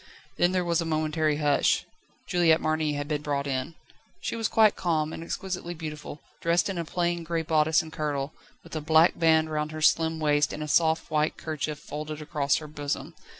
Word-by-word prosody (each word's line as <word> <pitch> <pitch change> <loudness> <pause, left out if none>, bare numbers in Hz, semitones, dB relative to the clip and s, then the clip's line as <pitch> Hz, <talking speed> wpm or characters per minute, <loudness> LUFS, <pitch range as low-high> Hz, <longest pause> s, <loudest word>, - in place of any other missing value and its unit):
Then 175 +1 +3
there 185 -1 0
was 170 -1 +1
a - - -2
momentary 155 -1 0
hush. 145 -2 +2 0.4
Juliette 170 -2 +3
Marny 155 -1 0
had 145 0 -3
been 150 -1 -1
brought 145 -1 -2
in. 135 +3 -3 0.4
She - - -3
was 225 -2 0
quite 215 -1 +4
calm, 160 -3 0
and 165 - -6
exquisitely 180 0 -4
beautiful, 155 -2 -7 0.2
dressed 170 +3 +2
in 180 - -4
a 170 - -2
plain 175 0 -1
grey 165 0 -2
bodice 155 -1 +3
and 160 -1 -11
kirtle, 145 -2 -2 0.3
with 165 - -10
a 155 - -2
black 160 +2 +4
band 160 -1 +4
round 150 0 -2
her 155 0 -6
slim 160 0 +3
waist 150 -1 +2
and 155 - -4
a - - -5
soft 160 +1 +2
white 155 0 +1
kerchief 155 -1 -3
folded 150 +1 -6
across 150 -2 0
her 155 - -4
bosom. 145 -1 -4
155 Hz, 195 wpm, -27 LUFS, 150-165 Hz, 0.4 s, quite